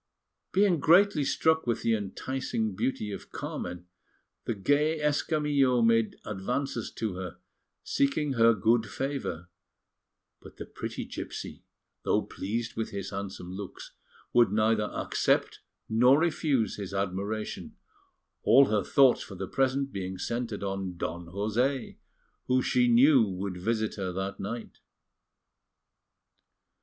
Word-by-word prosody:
Being 190 -4 +3
greatly 175 +1 +5
struck 160 +1 +2
with 120 - 0
the 115 - +2
enticing 110 +1 -2
beauty 105 -2 -2
of - - -8
Carmen, 90 0 -5 0.6
the 115 - -1
gay 150 +9 +2
Escamillo 145 -4 +2
made 115 -1 +3
advances 115 +4 -3
to 110 -3 -3
her, 90 -2 -6 0.5
seeking 140 +1 0
her 115 -2 +5
good 110 +2 +2
favour; 135 - -4 0.9
but - - -14
the - - -6
pretty - - -6
gipsy, - - -7 0.4
though - - +1
pleased 115 +4 -4
with 115 - -2
his 100 -1 -5
handsome 100 -2 -6
looks, 95 0 -8 0.4
would 120 -5 +5
neither 110 0 +2
accept - - 0 0.3
nor 125 +5 +5
refuse 155 -8 +1
his 100 -1 -6
admiration, 100 +3 -3 0.7
all 135 +1 +6
her 105 -1 +1
thoughts 135 -2 +4
for 100 - -8
the 95 +1 -5
present 135 +3 0
being 95 -2 -4
centred 115 0 -3
on 95 -2 -3
Don 85 +1 -4
José, 110 +8 -1 0.5
who 130 0 +2
she 125 -1 +3
knew 130 +3 +6
would 95 -2 -3
visit 110 +4 -1
her 95 -2 -2
that 95 +1 -4
night. 115 +4 -6
115 Hz, 125 wpm, -28 LUFS, 100-135 Hz, 0.9 s, all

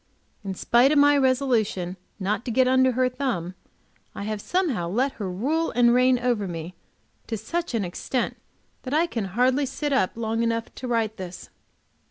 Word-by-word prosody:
In 195 -1 -4
spite 240 +8 +4
of 305 - +3
my 290 0 +6
resolution 250 -9 +1 0.2
not 205 +3 -1
to - - -3
get 255 +2 +3
under 260 0 +4
her 255 +1 +2
thumb, 250 -10 -3 0.6
I - - -5
have 215 0 -3
somehow 280 - -1
let 255 +9 +1
her 195 - -2
rule 295 - 0
and 240 0 +4
reign 250 +1 +4
over 240 -5 0
me 170 0 -6 0.5
to 225 - -3
such 335 +6 -3
an 210 -4 0
extent 235 +8 -2 0.5
that 265 +2 -3
I 325 +2 +4
can 230 - -3
hardly 260 +3 +3
sit 290 +2 -2
up 225 -9 +2
long 225 0 -1
enough 230 0 -1
to 255 - -7
write 225 -2 0
this. 180 -2 -8
240 Hz, 180 wpm, -25 LUFS, 205-265 Hz, 0.6 s, my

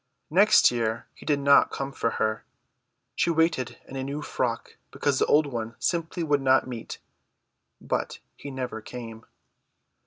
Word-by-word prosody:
Next 195 -2 +6
year 115 -1 -2
he - - -15
did 145 -2 +3
not 140 0 +5
come 135 0 -4
for 115 - -1
her. 110 0 -1 0.7
She - - +1
waited 160 -6 +1
in 135 - -9
a 135 - -3
new 140 +2 -4
frock 120 -5 -3
because 140 -2 0
the - - +2
old 150 +1 +4
one 115 -4 -5
simply 170 0 -1
would 145 -3 +1
not 130 0 +4
meet; 120 -3 -7 0.8
but - - -3 0.2
he 145 - -9
never 125 -4 -5
came. 115 -1 -9
135 Hz, 155 wpm, -26 LUFS, 115-145 Hz, 0.8 s, Next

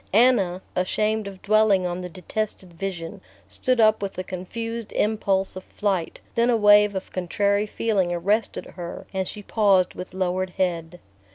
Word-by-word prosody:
Anna, 200 -6 +4
ashamed 210 +3 0
of 195 -1 -10
dwelling 210 -3 +4
on 180 0 -2
the 180 - -5
detested 185 +1 -4
vision, 185 +1 -5 0.3
stood 255 -1 0
up 215 -1 +5
with 200 -1 -4
a 185 - -2
confused 225 +5 -5
impulse 200 -3 +1
of 185 - -7
flight; 195 -5 -2
then 235 +1 +2
a 235 - +4
wave 205 -1 +6
of 190 - -5
contrary 200 +3 0
feeling 205 -5 0
arrested 200 +6 0
her 175 -1 -7
and 190 -1 -1
she 210 - -7
paused 195 -4 +3
with 185 0 -8
lowered 185 0 -1
head. 175 -2 -1
195 Hz, 160 wpm, -24 LUFS, 180-215 Hz, 0.3 s, wave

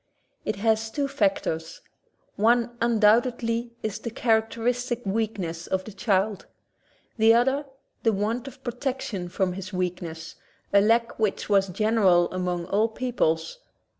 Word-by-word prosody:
It - - -1
has 220 +2 +1
two 280 +4 -1
factors: 195 - -1 0.5
One 235 +2 +2
undoubtedly 235 +1 +2
is 215 0 -3
the 235 - -5
character 225 -1 0
istic 245 0 -1
weakness 195 -5 -2
of 190 0 -1
the 215 - -10
child; 200 0 0 0.7
the 225 +1 +6
other, 265 +4 +2 0.3
the 225 - +3
want 220 +6 -2
of 265 0 -11
protection 240 -7 -3
for 185 +1 0
his 185 +1 -7
weakness, 175 -3 -4 0.4
a 200 - +7
lack 230 +3 +2
which 215 -1 -1
was 195 -1 +4
general 190 -3 +3
among 180 -1 -2
all 205 +5 +2
peoples. 225 - -1
220 Hz, 135 wpm, -26 LUFS, 190-235 Hz, 0.7 s, a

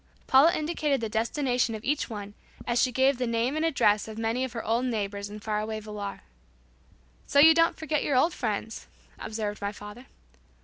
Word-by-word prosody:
Paula 275 +6 +6
indicated 305 -3 -1
the 225 -1 -3
destination 245 +1 0
of 215 - -8
each 295 0 0
one 205 -2 -7 0.3
as 240 0 +1
she 255 - +2
gave 265 +1 +2
the 250 - 0
name 230 +4 0
and 310 - -1
address 215 -11 +2
of 220 0 -8
many 225 +3 -1
of 260 -3 -4
her 230 - -5
old 235 +3 +1
neighbors 205 -4 -3
in 210 +1 -8
far 210 -1 -2
away 215 0 -4
Villar. 210 -2 -7 1.1
"So - - -1
you 320 +3 +9
don't 330 +1 +3
forget 310 -2 -1
your 280 - 0
old 325 +6 +3
friends," 220 -2 -4 0.3
observed 215 -1 -4
my 200 0 -2
father. 210 +5 -11
230 Hz, 190 wpm, -27 LUFS, 215-275 Hz, 1.1 s, you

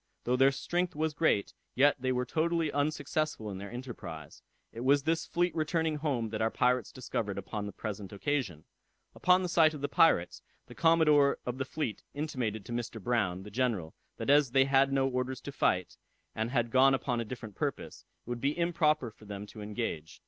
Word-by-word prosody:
Though 125 - +1
their 135 +2 +5
strength 175 +6 -2
was 155 0 -1
great, 145 -10 +1 0.2
yet 145 +3 +4
they 130 0 0
were 125 0 0
totally 165 +1 0
unsuccessful 145 -5 -1
in 95 - -6
their 100 0 -7
enterprise. 105 - -8 0.3
It 115 - -9
was 140 +3 +3
this 165 +2 0
fleet 175 0 0
returning 160 0 0
home 135 -7 -1
that 110 0 -4
our 110 - +2
pirates 125 -1 +1
discovered 110 -5 -3
upon 105 +1 -4
the - - -5
present 100 -1 -6
occasion. 100 - -2 0.5
Upon 180 +1 +3
the - - -1
sight 160 -2 +4
of 145 - -8
the 145 - 0
pirates, 90 - +3 0.2
the - - -12
commodore 150 -4 +4
of 125 +1 -4
the 135 - -1
fleet 130 -7 -3
intimated 125 -9 -3
to - - -9
Mr. 120 -1 -4
Brown, 95 -5 0
the 105 - -10
general, 110 -9 -1 0.2
that - - 0
as 145 -4 +4
they 135 -1 +5
had 135 0 +3
no 135 -1 +2
orders 125 0 -2
to 140 - -7
fight, 90 -9 0 0.4
and 110 +1 -2
had 120 -3 0
gone 135 +2 +5
upon 125 -2 -2
a - - -4
different 115 -2 -8
purpose, - - -4 0.2
it - - -41
would 120 -1 -4
be 140 +3 0
improper 160 -7 +1
for 105 - -18
them 100 0 -6
to 105 +1 -11
engage. 105 -7 -4
130 Hz, 200 wpm, -31 LUFS, 110-150 Hz, 0.5 s, their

